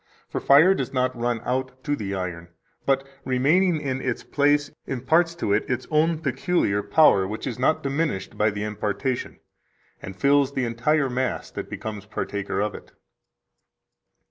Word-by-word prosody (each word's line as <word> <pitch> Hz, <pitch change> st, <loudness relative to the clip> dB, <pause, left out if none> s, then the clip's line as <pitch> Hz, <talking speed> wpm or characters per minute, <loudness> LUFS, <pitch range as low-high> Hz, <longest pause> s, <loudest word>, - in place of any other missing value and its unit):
For -, -, -4 dB
fire 155 Hz, +7 st, +6 dB
does 135 Hz, -9 st, -3 dB
not 130 Hz, -1 st, 0 dB
run 120 Hz, -1 st, -1 dB
out 130 Hz, +1 st, -3 dB
to 145 Hz, -1 st, 0 dB
the 100 Hz, -6 st, -4 dB
iron, 90 Hz, -2 st, -5 dB, 0.4 s
but, 135 Hz, 0 st, +2 dB, 0.2 s
remaining 155 Hz, +7 st, +2 dB
in 135 Hz, -3 st, -3 dB
its 125 Hz, -3 st, -2 dB
place, 145 Hz, 0 st, +2 dB, 0.2 s
imparts 160 Hz, +7 st, +1 dB
to 105 Hz, -12 st, -1 dB
it 105 Hz, -, 0 dB
its 125 Hz, -, -1 dB
own 160 Hz, +2 st, +3 dB
peculiar 140 Hz, -, 0 dB
power, 100 Hz, -9 st, +4 dB
which 105 Hz, +2 st, -5 dB
is 125 Hz, -2 st, -4 dB
not 135 Hz, +5 st, +2 dB
diminished 140 Hz, -7 st, -2 dB
by 105 Hz, +1 st, +2 dB
the 100 Hz, 0 st, -4 dB
impartation, 105 Hz, +4 st, -3 dB, 0.6 s
and 95 Hz, -, -8 dB
fills 140 Hz, +5 st, +3 dB
the 130 Hz, -2 st, 0 dB
entire 135 Hz, +5 st, +1 dB
mass 130 Hz, 0 st, -2 dB
that -, -, -6 dB
becomes 105 Hz, -2 st, -6 dB
partaker 100 Hz, -2 st, -3 dB
of 105 Hz, -1 st, -1 dB
it." -, -, -12 dB
130 Hz, 160 wpm, -24 LUFS, 105-145 Hz, 0.6 s, fire